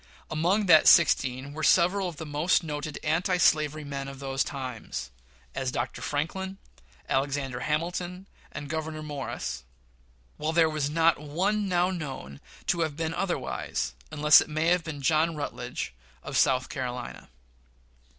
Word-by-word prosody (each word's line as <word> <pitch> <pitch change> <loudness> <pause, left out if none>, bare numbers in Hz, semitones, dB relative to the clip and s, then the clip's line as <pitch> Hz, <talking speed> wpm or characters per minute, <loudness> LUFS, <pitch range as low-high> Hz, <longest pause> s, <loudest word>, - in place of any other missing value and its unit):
Among 175 +7 +2
that 160 -4 +7
sixteen 135 -4 +4
were 155 - -6
several 180 +4 +4
of 170 - -9
the 160 - -6
most 150 +5 +2
noted 150 -1 -4
anti 175 +4 +1
slavery 155 -2 +3
men 140 -1 -5
of 135 0 -8
those 135 -1 -1
times 125 - -6 0.4
as 130 -1 -2
Dr. 120 0 -3
Franklin, 190 +6 -3 0.5
Alexander 135 -2 -1
Hamilton, 175 +4 -2 0.2
and 145 0 -6
Gouverneur 155 0 -4
Morris 140 - -5 0.7
while 155 +1 -1
there 165 -1 +4
was 150 -2 -1
not 165 +1 +3
one 195 +7 0
now 180 +1 +2
known 135 - -6 0.2
to 175 - +1
have 160 -3 -1
been 165 0 -2
otherwise, 170 -8 -2 0.2
unless 150 -1 +6
it - - -5
may 160 +3 +3
be 165 -2 -6
John 155 +3 +1
Rutledge, 125 - -4 0.3
of - - -6
South 130 -1 +3
Carolina. 125 -2 -5
155 Hz, 140 wpm, -28 LUFS, 140-170 Hz, 0.7 s, that